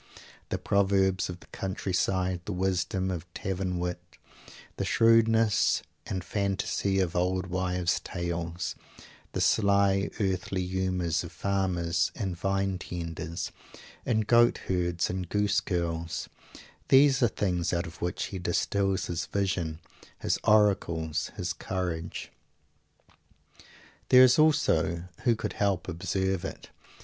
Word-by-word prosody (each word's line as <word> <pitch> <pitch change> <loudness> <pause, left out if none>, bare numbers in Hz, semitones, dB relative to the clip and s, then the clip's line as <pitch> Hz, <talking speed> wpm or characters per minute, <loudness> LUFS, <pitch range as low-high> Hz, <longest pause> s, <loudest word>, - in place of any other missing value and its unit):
The - - -1
proverbs 95 -2 +2
of 90 -1 -7
the - - -15
country 95 0 -4
side, 90 0 0
the - - -4
wisdom 95 0 0
of 90 0 -6
tavern 95 -1 -2
wit, 90 0 -2 0.8
the - - -1
shrewdness 115 -1 +4 0.2
and 95 -2 -3
fantasy 100 +1 -1
of 90 -3 0
old 90 +1 +1
wives 90 -1 0
tales, 85 0 -4 0.6
the - - -1
sly 100 -1 +3
earthly 95 -2 -1
humors 90 -3 -1
of 85 - -8
farmers 90 -3 0
and 95 -5 -3
vine 95 +1 -1
tenders 85 -2 -5 0.5
and 110 -3 +1
goat 120 +1 +5
herds 90 -2 0
and 90 -2 -4
goose 105 0 +2
girls 85 -3 -2 0.6
these 135 0 +6
are 120 - +6
things 90 -6 -1
out 85 -1 0
of 80 +1 -11
which 90 0 -2
he 95 - -3
distils 95 +2 0
his 85 -2 -3
vision, 90 -5 -1 0.4
his - - -1
oracles, 95 -7 +2
his - - -2
courage. 85 -3 -4 1.8
There 130 0 +9
is 130 +3 +5
also 85 - +3 0.2
who 120 - +4
could - - -4
help 100 -3 0
observing 95 +1 -1
it? - - -17
95 Hz, 125 wpm, -28 LUFS, 85-100 Hz, 1.8 s, There